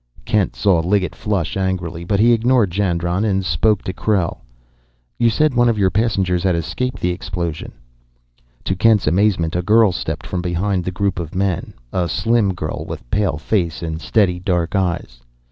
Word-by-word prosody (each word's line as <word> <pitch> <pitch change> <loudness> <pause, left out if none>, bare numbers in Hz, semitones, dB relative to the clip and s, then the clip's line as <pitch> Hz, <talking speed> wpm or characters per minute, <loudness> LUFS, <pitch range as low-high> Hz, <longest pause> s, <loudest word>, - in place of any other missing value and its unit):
Kent 105 -3 +1
saw 95 -5 +3
Liggett 90 +3 0
flush 100 -3 -2
angrily, 90 -3 -2
but 100 +3 0
he 120 +2 +5
ignored 115 -3 +2
Jandron 90 0 0
and 95 -3 0
spoke 90 +7 +1
to 95 - -4
Krell. 95 -3 0 0.8
"You 120 -1 +4
said 150 +5 +2
one 120 -1 +3
of 115 - 0
your 95 -2 +2
passengers 95 -5 +1
had 95 -2 +1
escaped 125 +10 -3
the 90 - +1
explosion?" 90 -3 -4 0.9
To 95 - -1
Kent's 110 +1 +3
amazement 85 -1 +1
a 90 - +1
girl 110 +2 +4
stepped 90 - -4
from 90 - -3
behind 90 +1 -1
the 90 - -2
group 95 -1 -1
of 85 -1 -6
men, 95 -2 -1 0.2
a 90 -2 0
slim 110 0 +1
girl 75 -3 -4
with - - -7
pale 100 -7 +1
face 85 0 -1
and 80 -1 -4
steady, 95 -4 +1
dark 90 0 -1
eyes. 85 -10 -2
95 Hz, 175 wpm, -19 LUFS, 85-105 Hz, 0.9 s, he